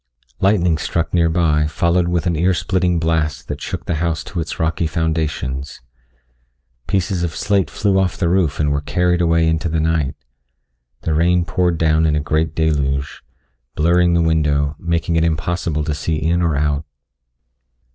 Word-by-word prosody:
Lightning 90 Hz, -5 st, +2 dB
struck 85 Hz, +1 st, -2 dB
near 85 Hz, -2 st, +3 dB
by 80 Hz, -3 st, +2 dB
followed 85 Hz, +3 st, +1 dB
with 85 Hz, -2 st, -1 dB
an 85 Hz, -2 st, +1 dB
ear 90 Hz, +4 st, +2 dB
splitting 90 Hz, -2 st, 0 dB
blast 80 Hz, -1 st, -1 dB
that -, -, -5 dB
shook -, -, -5 dB
the -, -, -1 dB
house 85 Hz, -2 st, -1 dB
to 90 Hz, -, -6 dB
its 80 Hz, -, -4 dB
rocky 80 Hz, 0 st, 0 dB
foundations. 80 Hz, -5 st, -2 dB, 1.1 s
Pieces 95 Hz, -2 st, 0 dB
of 85 Hz, -2 st, -2 dB
slate 100 Hz, -7 st, +1 dB
flew 100 Hz, +4 st, +1 dB
off 95 Hz, -2 st, 0 dB
the 85 Hz, -, 0 dB
roof 85 Hz, -4 st, +1 dB
and 75 Hz, -1 st, +1 dB
were 70 Hz, 0 st, 0 dB
carried 90 Hz, +3 st, +1 dB
away 85 Hz, -1 st, +3 dB
into 80 Hz, +1 st, 0 dB
the 80 Hz, 0 st, 0 dB
night. 80 Hz, -3 st, 0 dB, 0.9 s
The 80 Hz, -, -1 dB
rain 85 Hz, +2 st, +2 dB
poured 90 Hz, -2 st, 0 dB
down 80 Hz, 0 st, +2 dB
in 75 Hz, -, +1 dB
a -, -, +1 dB
great 75 Hz, +1 st, -1 dB
deluge, 70 Hz, -3 st, -1 dB, 0.5 s
blurring 85 Hz, +2 st, +3 dB
the 85 Hz, -, +3 dB
window, 75 Hz, -2 st, +1 dB
making 85 Hz, -1 st, -1 dB
it 80 Hz, -, +2 dB
impossible 80 Hz, -1 st, -1 dB
to 75 Hz, 0 st, -2 dB
see 80 Hz, +2 st, -2 dB
in 80 Hz, +3 st, 0 dB
or 85 Hz, -3 st, +1 dB
out. 75 Hz, 0 st, 0 dB
80 Hz, 170 wpm, -19 LUFS, 75-85 Hz, 1.1 s, near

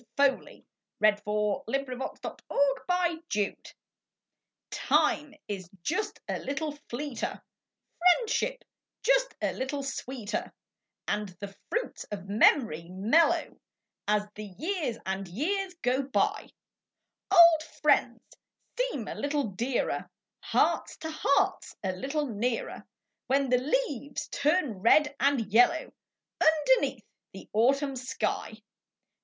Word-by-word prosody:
fOLEY 280 Hz, -1 st, +1 dB
« -, -, -61 dB
*«. -, -, -10 dB
©CI.A597234 260 Hz, -, -1 dB, 1.2 s
IME 295 Hz, -1 st, +2 dB
is 190 Hz, -4 st, -5 dB
"just 370 Hz, +7 st, -2 dB
a -, -, -2 dB
little 290 Hz, +3 st, -3 dB, 0.2 s
fleeter; 265 Hz, 0 st, -4 dB, 0.6 s
priendship 480 Hz, +7 st, +2 dB, 0.4 s
just -, -, +3 dB
a -, -, +1 dB
little 275 Hz, +2 st, -3 dB
sweeter; 255 Hz, -4 st, -4 dB, 0.6 s
And 210 Hz, -1 st, -1 dB
the 200 Hz, -1 st, -7 dB, 0.2 s
jruits 485 Hz, +2 st, -2 dB
of 205 Hz, -2 st, -4 dB
memoru 200 Hz, -, +3 dB
mellcrcO 210 Hz, -, +2 dB, 0.2 s
' -, -, -60 dB
I 210 Hz, -, +4 dB
As 210 Hz, 0 st, -1 dB
the 205 Hz, -3 st, -9 dB
Ljears 320 Hz, -, -2 dB
and 190 Hz, 0 st, -3 dB
Ejears 365 Hz, -, -2 dB
ao 255 Hz, +2 st, +2 dB
btj. 270 Hz, -1 st, 0 dB
d -, -, -25 dB, 0.8 s
Old 340 Hz, -4 st, +8 dB
'friends 315 Hz, -, +1 dB, 0.5 s
seem -, -, -2 dB
a -, -, -4 dB
little 285 Hz, -4 st, -1 dB
dearer; 235 Hz, +7 st, -2 dB, 0.3 s
Hearts -, -, +1 dB
to 320 Hz, -, -5 dB
Hearts 280 Hz, -2 st, +1 dB
a 190 Hz, -, 0 dB
little 275 Hz, +11 st, -2 dB
nearer, 230 Hz, 0 st, -3 dB, 0.2 s
( -, -, -57 dB
ADhen 275 Hz, -1 st, +2 dB
the 250 Hz, -, +5 dB
leases 285 Hz, -, -2 dB
turn 285 Hz, -, +1 dB
red 290 Hz, +8 st, +4 dB
and 280 Hz, -2 st, +3 dB
Ljello^ 235 Hz, +9 st, +3 dB, 0.5 s
Underneath 320 Hz, +9 st, +3 dB, 0.3 s
the -, -, -10 dB
Autumn 270 Hz, +6 st, +3 dB
shij. 245 Hz, -3 st, -3 dB
270 Hz, 115 wpm, -29 LUFS, 215-315 Hz, 1.2 s, Old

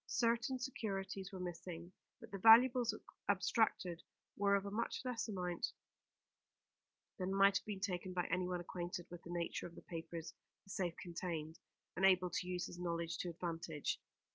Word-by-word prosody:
Certain 235 Hz, +6 st, +2 dB
securities 195 Hz, -6 st, -3 dB
were 190 Hz, -, -6 dB
missing, 175 Hz, -1 st, -5 dB, 0.3 s
but -, -, -12 dB
the 195 Hz, -, -4 dB
valuables 235 Hz, +3 st, +8 dB, 0.4 s
abstracted 190 Hz, -3 st, +2 dB, 0.3 s
were 200 Hz, 0 st, +4 dB
of 200 Hz, 0 st, +1 dB
a 200 Hz, -, -4 dB
much 230 Hz, +3 st, -1 dB
less 250 Hz, -2 st, -1 dB
amount 180 Hz, -4 st, -1 dB, 1.5 s
than 185 Hz, 0 st, -1 dB
might 195 Hz, 0 st, +6 dB
have 205 Hz, -, -22 dB
been 205 Hz, -2 st, -3 dB
taken 185 Hz, -2 st, -1 dB
by 180 Hz, -1 st, 0 dB
anyone 180 Hz, 0 st, +1 dB
acquainted 175 Hz, 0 st, -4 dB
with 175 Hz, -1 st, -7 dB
the -, -, -11 dB
nature 175 Hz, -1 st, -2 dB
of 170 Hz, -, -14 dB
the -, -, -11 dB
papers 165 Hz, -1 st, -6 dB, 0.3 s
the 195 Hz, -, -12 dB
safe 180 Hz, -4 st, -1 dB
contained, 165 Hz, -2 st, -4 dB, 0.4 s
and 185 Hz, -, -2 dB
able 185 Hz, -2 st, +5 dB
to 180 Hz, -, -1 dB
use 180 Hz, -1 st, -1 dB
his 175 Hz, -, -8 dB
knowledge 170 Hz, -2 st, -2 dB
to 180 Hz, -, -1 dB
advantage. 165 Hz, -3 st, -3 dB
180 Hz, 165 wpm, -38 LUFS, 175-200 Hz, 1.5 s, valuables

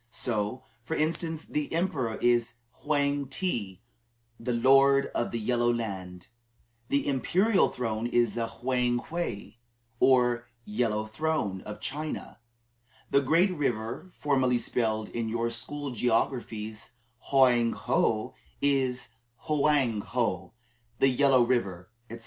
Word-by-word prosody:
So, 115 Hz, +1 st, -2 dB, 0.2 s
for 160 Hz, +7 st, -3 dB
instance, 160 Hz, +1 st, -1 dB
the 150 Hz, -1 st, -3 dB
emperor 150 Hz, -10 st, -1 dB
is 120 Hz, -1 st, +2 dB, 0.2 s
"Hwang 140 Hz, +2 st, 0 dB
ti" 115 Hz, -, -3 dB, 0.6 s
the 120 Hz, +2 st, -2 dB
"Lord 135 Hz, +3 st, +4 dB
of 120 Hz, -, -1 dB
the 115 Hz, -, -3 dB
Yellow 120 Hz, +2 st, +1 dB
Land"; 95 Hz, -6 st, -5 dB, 0.6 s
the 140 Hz, -, +1 dB
imperial 185 Hz, -, +2 dB
throne 115 Hz, -2 st, -2 dB
is 120 Hz, -1 st, +2 dB
the 115 Hz, -1 st, -2 dB
"Hwang 120 Hz, +1 st, 0 dB
wei" 165 Hz, -10 st, -4 dB, 0.4 s
or 120 Hz, -2 st, +3 dB, 0.2 s
"yellow 110 Hz, 0 st, -1 dB
throne" 110 Hz, -5 st, -2 dB
of 105 Hz, -, -7 dB
China; 155 Hz, +2 st, -5 dB, 0.7 s
the 140 Hz, -, +5 dB
great 165 Hz, +8 st, +3 dB
river, 120 Hz, +4 st, -2 dB
formerly 130 Hz, -4 st, +2 dB
spelled 110 Hz, -2 st, -1 dB
in 115 Hz, -1 st, -3 dB
your 115 Hz, +1 st, -1 dB
school 140 Hz, +4 st, -4 dB
geographies 115 Hz, -2 st, -2 dB, 0.4 s
Hoang 125 Hz, -4 st, +4 dB
ho, -, -, 0 dB, 0.3 s
is 135 Hz, -4 st, 0 dB, 0.4 s
"Hwang 145 Hz, -7 st, +2 dB
ho," 105 Hz, -3 st, -2 dB, 0.4 s
the 135 Hz, -, +4 dB
"yellow 130 Hz, -1 st, +4 dB
river," 100 Hz, -7 st, -1 dB, 0.2 s
etc. 115 Hz, +1 st, -8 dB
120 Hz, 120 wpm, -28 LUFS, 115-140 Hz, 0.7 s, the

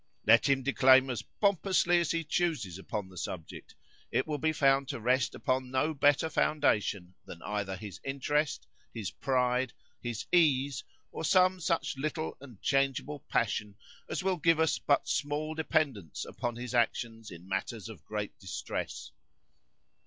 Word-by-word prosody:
"Let 115 Hz, +5 st, +6 dB
him 135 Hz, -1 st, +2 dB
declaim 130 Hz, -1 st, +5 dB
as 120 Hz, -, -3 dB
pompously 190 Hz, -3 st, +2 dB
as 170 Hz, -, 0 dB
he 165 Hz, 0 st, 0 dB
chooses 150 Hz, -, -1 dB
upon 100 Hz, 0 st, -4 dB
the 95 Hz, -1 st, -14 dB
subject, 85 Hz, -4 st, -7 dB, 0.3 s
it 130 Hz, -, +1 dB
will 150 Hz, -2 st, -3 dB
be 160 Hz, 0 st, +2 dB
found 135 Hz, -2 st, +3 dB
to -, -, -4 dB
rest 125 Hz, +1 st, +1 dB
upon 130 Hz, 0 st, -1 dB
no 130 Hz, +5 st, +1 dB
better 145 Hz, +2 st, +3 dB
foundation 105 Hz, -, +1 dB
than 85 Hz, -, -10 dB
either 100 Hz, -2 st, -2 dB
his 100 Hz, +1 st, -8 dB
interest, 140 Hz, +2 st, -1 dB, 0.3 s
his 110 Hz, -6 st, -5 dB
pride, 125 Hz, -1 st, 0 dB, 0.3 s
his 120 Hz, -3 st, -4 dB
ease, 140 Hz, -5 st, +3 dB, 0.3 s
or -, -, -6 dB
some 185 Hz, +2 st, +4 dB
such 155 Hz, -5 st, -1 dB
little 155 Hz, +3 st, -3 dB
and 125 Hz, -8 st, -12 dB
changeable 135 Hz, +2 st, 0 dB
passion 105 Hz, -2 st, 0 dB, 0.3 s
as -, -, -2 dB
will 190 Hz, -1 st, +1 dB
give 165 Hz, 0 st, +3 dB
us 160 Hz, -1 st, +2 dB
but 145 Hz, -, +2 dB
small 150 Hz, +2 st, -1 dB
dependence 145 Hz, -, -1 dB
upon 120 Hz, -1 st, -4 dB
his 125 Hz, +1 st, -6 dB
actions 115 Hz, -2 st, 0 dB
in 90 Hz, -1 st, -11 dB
matters 95 Hz, +3 st, -3 dB
of 110 Hz, -, -11 dB
great 105 Hz, -1 st, -4 dB
distress. 95 Hz, -2 st, -5 dB
135 Hz, 155 wpm, -30 LUFS, 110-155 Hz, 0.3 s, Let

